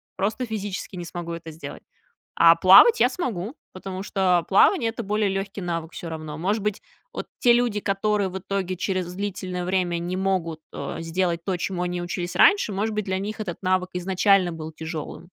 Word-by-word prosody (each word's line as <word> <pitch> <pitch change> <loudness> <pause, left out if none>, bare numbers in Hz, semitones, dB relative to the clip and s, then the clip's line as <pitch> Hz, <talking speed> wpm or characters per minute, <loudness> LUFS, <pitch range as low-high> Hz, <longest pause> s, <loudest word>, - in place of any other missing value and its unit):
Просто 215 +6 -1
физически 205 -4 -5
не 175 -1 -6
смогу 170 0 -6
это 165 -1 -7
сделать. 150 -2 -9 0.6
А 165 0 +8
плавать 195 - +8
я - - +6
смогу, 235 - -4 0.2
потому 185 0 -6
что 185 -4 +1
плавание- 230 - +4
это 235 0 -6
более 210 0 0
лёгкий 195 +1 -3
навык 165 -2 -3
всё 170 - -7
равно. 155 -2 -6
Может 200 +5 -1
быть, 210 -1 -2 0.3
вот - - -5
те 240 -1 +5
люди, 235 -3 +1
которые 200 0 0
в 190 - -5
итоге 185 -1 -3
через 185 -2 -2
длительное 185 -2 -4
время 180 -2 0
не 175 +2 -3
могут, 185 -4 -1
э, - - -5
сделать 170 0 -1
то, 190 -2 -1
чему 180 0 -3
они 180 0 -2
учились 175 0 -4
раньше, 400 - +5
может 210 +2 -1
быть, 215 - -1
для 190 0 -1
них 210 +3 -5
этот 175 -5 -4
навык 185 0 +1
изначально 185 0 +3
был 160 0 -7
тяжёлым. 160 +1 -7
185 Hz, 190 wpm, -24 LUFS, 175-200 Hz, 0.6 s, А